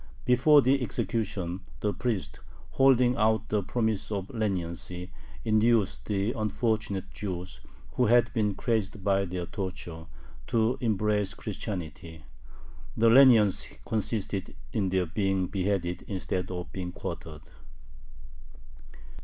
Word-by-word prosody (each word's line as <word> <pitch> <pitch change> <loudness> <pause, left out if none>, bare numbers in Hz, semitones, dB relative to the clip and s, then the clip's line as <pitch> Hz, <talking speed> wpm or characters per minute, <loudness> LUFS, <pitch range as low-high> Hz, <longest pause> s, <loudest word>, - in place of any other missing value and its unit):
Before 135 +4 +6
the 135 +2 +3
execution 100 -6 -2 0.2
the 105 -1 0
priest, 115 -6 -3 0.3
holding 125 -2 +4
out 110 0 +2
the 105 -1 +1
promise 110 +1 -1
of 100 -2 -3
leniency, 90 -4 -3 0.3
induced 110 -1 +2
the 100 +1 0
unfortunate 110 -3 -1
Jews, 95 -3 -6 0.3
who - - +2
had 120 +1 +4
been 105 -4 +1
crazed 110 -4 -1
by 100 0 +2
their 90 -1 -4
tortures, 85 -3 -6 0.4
to 115 +2 +1
embrace 105 -3 +1
Christianity. 80 -5 -6 0.7
The 115 +1 +5
leniency 115 -6 +5
consisted 105 -3 -2 0.2
in 100 -3 +1
their 95 -1 +1
being 95 +1 0
beheaded 90 -1 -1
instead 95 -2 -3
of 90 -1 -5
being 90 -2 -4
quartered. 75 -2 -7
100 Hz, 110 wpm, -28 LUFS, 90-110 Hz, 0.7 s, Before